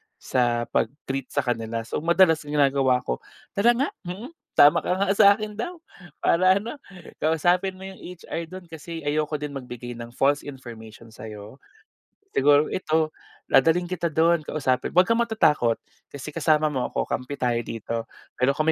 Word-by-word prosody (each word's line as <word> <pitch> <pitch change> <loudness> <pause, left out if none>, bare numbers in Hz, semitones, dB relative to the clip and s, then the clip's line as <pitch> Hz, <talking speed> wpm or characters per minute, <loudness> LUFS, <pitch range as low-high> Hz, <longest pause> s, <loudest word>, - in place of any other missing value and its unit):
sa 120 -2 0
pag-treat 135 +1 -2
sa 140 - -1
kanila. 115 -2 -2
So 115 - -4
madalas 170 0 +4
ginagawa 140 -4 +2
ko, 60 - -3 0.3
"Tara 235 +4 +3
nga, 270 +4 0 0.2
mhm, 210 - -6 0.2
tama 145 +4 +7
ka - - -3
nga, 195 +1 0
sa 200 0 +6
akin 215 0 -6
daw, 350 +9 -3 0.5
para 185 +2 +4
ano, 230 +8 -4 0.4
kausapin 175 +4 +1
mo 190 - -12
yung 190 0 -9
HR 170 -1 -7
dun. 185 +1 -10
Kasi 165 0 -7
ayoko 150 +1 0
din 150 -1 -4
magbigay 125 -3 -7
ng 120 +1 -9
false 145 +2 +1
information 115 -4 -10
sa'yo. 110 +3 -10 0.7
Siguro 145 +2 +5
ito, 155 -3 0 0.3
dadalhin 165 +5 +4
kita 175 -1 -2
don 165 +2 +3
kausapin 135 -4 -1
huwag 180 +1 +4
kang 230 +1 +2
matatakot, 150 - +2 0.3
kasi 140 -2 -8
kasama 155 -1 +2
mo 130 - -1
ako, - - -2
kampi 125 +3 -4
tayo 120 -2 0
dito. 115 0 -5 0.4
Pero 135 +3 +1
kung 155 - +1
150 Hz, 160 wpm, -25 LUFS, 125-180 Hz, 0.7 s, tama